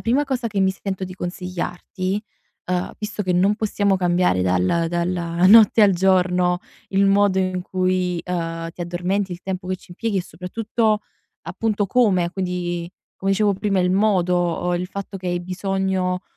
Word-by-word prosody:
prima 260 Hz, +6 st, +1 dB
cosa 255 Hz, -4 st, -2 dB
che 200 Hz, -2 st, -3 dB
mi 190 Hz, 0 st, +3 dB
sento 190 Hz, -1 st, -4 dB
di 185 Hz, 0 st, -8 dB
consigliarti, 180 Hz, +2 st, -4 dB, 0.5 s
uhm, 180 Hz, 0 st, -1 dB
visto 210 Hz, 0 st, -4 dB
che 185 Hz, -1 st, 0 dB
non 190 Hz, +4 st, +3 dB
possiamo 205 Hz, -2 st, +1 dB
cambiare 175 Hz, -, +2 dB
dal 95 Hz, -, +1 dB
dalla 175 Hz, 0 st, 0 dB
notte 220 Hz, +1 st, +7 dB
al 200 Hz, -2 st, +6 dB
giorno 180 Hz, -1 st, +2 dB, 0.3 s
il 195 Hz, 0 st, +2 dB
modo 200 Hz, -1 st, +3 dB
in 185 Hz, -1 st, -1 dB
cui, 185 Hz, -1 st, 0 dB
uhm, 165 Hz, -2 st, -3 dB
ti 175 Hz, -, -14 dB
addormenti, 180 Hz, +3 st, -1 dB
il 175 Hz, +1 st, -6 dB
tempo 185 Hz, -1 st, -5 dB
che 185 Hz, -, -1 dB
ci 180 Hz, -, -15 dB
impieghi, 215 Hz, +2 st, -2 dB
e 180 Hz, -, +1 dB
soprattutto, 215 Hz, +5 st, -1 dB, 0.4 s
appunto, 215 Hz, -3 st, -1 dB
come, 190 Hz, -7 st, +2 dB
quindi, 175 Hz, -2 st, -3 dB, 0.2 s
come 195 Hz, +1 st, -2 dB
dicevo 205 Hz, +1 st, +3 dB
prima, 200 Hz, -1 st, 0 dB
il 180 Hz, 0 st, +2 dB
modo, 180 Hz, -4 st, +2 dB
uhm, 175 Hz, -, +1 dB
il 180 Hz, +1 st, -3 dB
fatto 200 Hz, 0 st, -6 dB
che 180 Hz, -1 st, -5 dB
hai 175 Hz, 0 st, 0 dB
bisogno, 185 Hz, 0 st, -1 dB
185 Hz, 170 wpm, -22 LUFS, 180-200 Hz, 0.5 s, notte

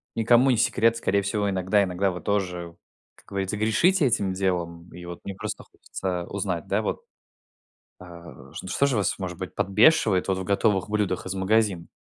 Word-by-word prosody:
никому 120 Hz, +3 st, +4 dB
не 120 Hz, -, +3 dB
секрет. 115 Hz, 0 st, +2 dB
Скорее 100 Hz, -2 st, +1 dB
всего, 100 Hz, +1 st, -1 dB
иногда 95 Hz, +2 st, +2 dB
иногда 95 Hz, +1 st, 0 dB
вы 90 Hz, -, -7 dB
тоже, 90 Hz, -4 st, -2 dB, 0.4 s
как -, -, -24 dB
говорится, 100 Hz, +1 st, -3 dB
грешите 150 Hz, -, +3 dB
этим 100 Hz, -6 st, +1 dB
делом, 90 Hz, -3 st, -2 dB
и 90 Hz, +1 st, -10 dB
вот 85 Hz, 0 st, -8 dB
мне 100 Hz, -, -6 dB
просто -, -, -6 dB
хочется 90 Hz, -2 st, -5 dB
узнать, 95 Hz, -4 st, -3 dB
да -, -, +1 dB
вот, -, -, -3 dB, 1.0 s
а, 85 Hz, -6 st, -13 dB
ш -, -, -8 dB
что 140 Hz, -, +2 dB
же 135 Hz, -3 st, 0 dB
вас, 100 Hz, -4 st, 0 dB
может 90 Hz, -3 st, -5 dB
быть, 95 Hz, -, -6 dB
подбешивает 105 Hz, -, +3 dB
в 95 Hz, -1 st, -1 dB
готовых 100 Hz, 0 st, +1 dB
блюдах 100 Hz, -4 st, -1 dB
из 95 Hz, -, -3 dB
магазина? 95 Hz, -2 st, +1 dB
95 Hz, 175 wpm, -25 LUFS, 90-105 Hz, 1.0 s, никому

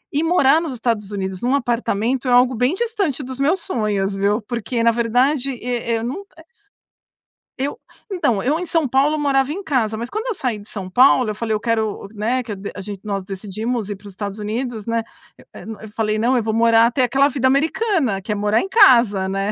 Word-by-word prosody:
e 300 Hz, -, +2 dB
morar 325 Hz, -2 st, +4 dB
nos 310 Hz, -6 st, -4 dB
Estados 225 Hz, -4 st, -2 dB
Unidos 190 Hz, -2 st, -4 dB
num 255 Hz, +3 st, +1 dB
apartamento 240 Hz, 0 st, -1 dB
é 250 Hz, -, +2 dB
algo 250 Hz, +1 st, +5 dB
bem 250 Hz, +7 st, +1 dB
distante 395 Hz, -, -1 dB
dos 260 Hz, +1 st, -7 dB
meus 325 Hz, +6 st, +1 dB
sonhos, 210 Hz, -, -1 dB
viu. 205 Hz, +3 st, 0 dB
Porque 235 Hz, +1 st, -3 dB
na 230 Hz, -, +5 dB
verdade 245 Hz, +4 st, +1 dB
eh, 240 Hz, -1 st, -2 dB
e -, -, +2 dB
eu 225 Hz, -, -4 dB
não 270 Hz, +12 st, -4 dB, 1.4 s
Eu 285 Hz, -, -2 dB, 0.3 s
então 250 Hz, -, 0 dB
eu 285 Hz, +8 st, +1 dB
em 360 Hz, -, -4 dB
São 325 Hz, -4 st, +1 dB
Paulo, 280 Hz, +4 st, +2 dB
morava 275 Hz, -1 st, +1 dB
em 385 Hz, +6 st, -4 dB
casa, 235 Hz, -, 0 dB
mas 235 Hz, +2 st, -5 dB
quando 435 Hz, -, -4 dB
eu -, -, 0 dB
saí 250 Hz, -, -2 dB
de 205 Hz, -, -13 dB
São 190 Hz, -3 st, -6 dB
Paulo, 250 Hz, +2 st, +4 dB
eu 210 Hz, -, -3 dB
falei 220 Hz, 0 st, -2 dB
eu 215 Hz, -, 0 dB
quero, 220 Hz, -3 st, -2 dB
né? 230 Hz, +5 st, 0 dB
Que 225 Hz, -4 st, -6 dB
de 200 Hz, +1 st, -7 dB
a -, -, -9 dB
gente, 200 Hz, 0 st, -7 dB
nós 200 Hz, -2 st, -3 dB
decidimos 210 Hz, +3 st, -4 dB
ir 205 Hz, -, -4 dB
para 200 Hz, +1 st, -14 dB
os 200 Hz, -, -11 dB
Estados 200 Hz, +1 st, -6 dB
Unidos, 220 Hz, +1 st, -4 dB
né? 230 Hz, 0 st, 0 dB, 0.5 s
Eh, -, -, -10 dB, 0.2 s
eu 220 Hz, -, -9 dB
falei 215 Hz, -1 st, -1 dB
não, 245 Hz, +4 st, +2 dB
eu 230 Hz, -, 0 dB
vou 220 Hz, -, -1 dB
morar 230 Hz, 0 st, +5 dB
até 245 Hz, +2 st, +1 dB
aquela 270 Hz, +3 st, +3 dB
vida 265 Hz, -2 st, 0 dB
americana, 280 Hz, -, +1 dB
que 210 Hz, -, -5 dB
é -, -, 0 dB
morar 210 Hz, +2 st, +1 dB
em 385 Hz, -, -5 dB
casa, 235 Hz, -, +5 dB
né? 195 Hz, +2 st, -1 dB
235 Hz, 220 wpm, -20 LUFS, 210-270 Hz, 1.4 s, algo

